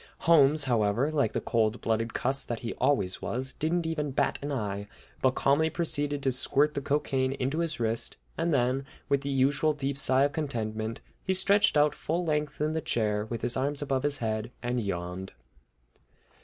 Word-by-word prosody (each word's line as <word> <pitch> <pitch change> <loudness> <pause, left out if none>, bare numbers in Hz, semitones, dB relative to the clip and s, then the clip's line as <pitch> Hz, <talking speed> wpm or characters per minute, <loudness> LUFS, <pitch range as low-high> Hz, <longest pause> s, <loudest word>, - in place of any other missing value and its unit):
Holmes, 150 -2 +5
however, 120 +2 +1
like 140 -8 +1
the - - 0
cold 115 0 0
blooded 115 0 0
old - - -13
cuss 135 +2 +1
that 120 -1 -4
he 115 - -4
always 130 -9 +1
was, 130 +2 -3
didn't 165 +2 -1
even 155 -2 -1
bat 135 - 0
an 145 +1 -4
eye, 105 -6 -3 0.3
but 130 -1 +3
calmly 145 +4 +3
proceeded 145 -3 -1
to 135 - +2
squirt 145 +4 +2
the 140 - -2
cocaine 135 -2 0
into 135 +4 -2
his 165 -4 -1
wrist, 115 0 -1 0.2
and 165 +1 0
then, 130 -1 +1 0.3
with 140 -1 +2
the 140 - -4
usual 140 +3 +2
deep 140 -1 0
sigh 130 0 +3
of 145 - +2
contentment, 115 -7 -3 0.2
he 190 - 0
stretched 200 -1 +3
out 150 0 +4
full 170 +4 -2
length 150 -2 -1
in 155 +1 0
the 160 - -1
chair, 105 -5 0
with 115 0 -5
his 120 - 0
arms 140 +2 0
above 135 -2 0
his 145 0 0
head, 110 -1 -2
and 120 +1 0
yawned. 95 -2 -4
135 Hz, 190 wpm, -28 LUFS, 115-150 Hz, 0.3 s, Holmes